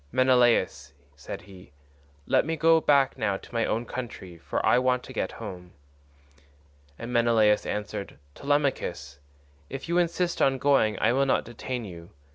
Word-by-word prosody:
"Menelaus," 120 - +2 0.2
said 70 - -8
he, 95 -6 -15 0.5
"let - - +3
me 160 +2 -2
go 165 +1 +4
back 140 -3 +2
now 100 -4 0
to - - -16
my 115 -1 0
own 115 +2 -1
country, 105 -9 -7
for - - -3
I - - +5
want 125 0 +1
to 130 - -10
get - - -3
home." 90 -5 -9 1.2
And 120 +1 -7
Menelaus 115 -3 +3
answered, 105 -4 -5 0.2
"Telemachus, 140 - -2 0.5
if 135 - -7
you 170 +1 +2
insist 175 0 0
on 135 0 +3
going 130 -6 +2
I 115 - +3
will 135 +1 +2
not - - +1
detain 120 +1 -5
you. 85 -3 -10
120 Hz, 155 wpm, -26 LUFS, 100-135 Hz, 1.2 s, I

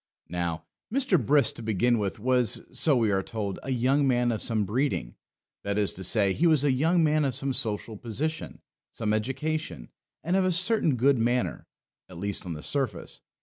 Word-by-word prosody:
Now, 85 -1 -3 0.3
Mr. 250 - +2
Brisk, 145 0 +3
to - - -7
begin 115 +2 +1
with, 100 +2 -2
was, 125 0 +1
so 150 -4 +3
we 115 -4 +2
are 95 -1 +1
told, 100 -2 -4
a - - -7
young 135 +3 +2
man 120 -2 +2
of 110 - -2
some 110 -3 0
breeding, 105 - -1 0.5
that 100 0 -2
is 105 -2 +1
to 95 - -8
say, 100 +1 +2
he 170 - +2
was 155 -4 +3
a 145 - +3
young 165 +6 +2
man 155 0 +2
of 135 -4 -1
some 135 0 -1
social 110 -1 -2
position, 145 +9 -4 0.3
some 105 -2 -2
education, 135 - -3 0.3
and 175 +3 0
of 190 - +3
a 185 - +2
certain 180 - +2
good 130 +1 +3
manner, 120 +2 -1 0.4
at 90 - -11
least 100 0 -3
on 85 - -3
the 75 - -8
surface. 130 -11 -3
125 Hz, 190 wpm, -27 LUFS, 105-145 Hz, 0.5 s, Brisk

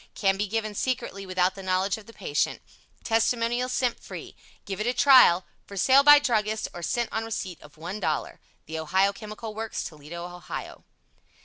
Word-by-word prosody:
Can 195 -2 +2
be 205 +2 -2
given 215 +1 -2
Secretly 230 -4 -3
without 185 0 +1
the 195 - -9
knowledge 185 +1 0
of 215 -2 -12
the - - -11
patient. 165 -9 -2 0.4
Testimonials 235 +2 +1
SENT 250 -1 0
FREE. - - -9 0.3
Give 200 0 -4
it 215 - -1
a 245 - 0
Trial. 250 -10 +7 0.2
For 200 - -9
sale 265 +7 +6
by 295 +1 +9
Druggists, 220 -6 0
or 175 - -7
sent 235 +7 -1
on 220 - -1
receipt 195 -6 -5
of 150 -1 -15
$1.00. 165 -2 -3 0.3
THE 160 +1 -5
OHIO 190 +6 +2
CHEMICAL 215 +1 -8
WORKS 225 +1 -4
TOLEDO, 155 +3 -8
OHIO. 175 0 -8
205 Hz, 175 wpm, -26 LUFS, 180-230 Hz, 0.4 s, by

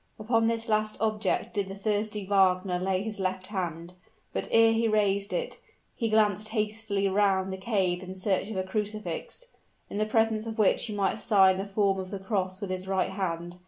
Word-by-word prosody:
Upon 225 +1 +1
this 230 0 -1
last 215 -1 +1
object 215 -2 0
did 200 -3 -1
the 195 - -7
thirsty 210 0 -2
Wagner 185 -2 +2
lay 190 +1 0
his 215 -2 -5
left 185 0 -2
hand; 175 -4 -4 0.4
but - - -2
ere 225 0 +5
he 225 0 +2
raised 200 -2 +1
it, - - -3 0.4
he 230 -2 -1
glanced 215 -1 +2
hastily 215 -2 -1
round 195 -1 +2
the - - -4
cave 190 -3 0
in 185 0 -8
search 190 0 0
of 215 - -4
a 185 - 0
crucifix, 210 - -4 0.5
in 205 - -3
the 215 - +1
presence 220 0 +1
of 225 - -5
which 215 +2 +3
he 210 - -5
might 200 -1 0
sign 190 -4 +4
the 195 - -3
form 195 -1 +1
of 185 -1 -5
the 200 - -4
cross 190 -1 -2
with 200 -2 -4
his 185 0 -4
right 190 -1 0
hand. 175 -2 -3
200 Hz, 195 wpm, -28 LUFS, 190-215 Hz, 0.5 s, ere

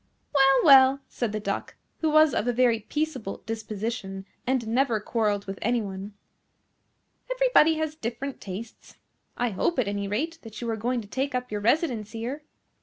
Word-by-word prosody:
"Well, 270 -1 +5
well," 270 -2 +7
said 240 -4 -2
the 215 - -2
Duck, 210 - -4 0.2
who 320 - +1
was 310 -2 +5
of 220 - 0
a - - +3
very 240 -2 +3
peaceable 265 -4 -4
disposition, 215 -2 -4 0.2
and 255 -3 0
never 235 -1 +2
quarrelled 210 -2 -1
with 195 0 -6
any 240 +2 +1
one, 200 -1 -6 1.2
"everybody - - +4
has 315 -1 -2
different 265 0 -5
tastes. 210 +4 -8 0.4
I 245 -1 0
hope, 210 - 0
at 250 -5 +1
any 200 0 -2
rate, 320 +11 -2
that 220 -2 -10
you 235 - -4
are - - -1
going 240 +3 -1
to 210 - -12
take 265 +5 -2
up 250 -2 -3
your 210 -1 -2
residence 235 -3 +1
here." 240 +6 -4
235 Hz, 175 wpm, -26 LUFS, 210-275 Hz, 1.2 s, well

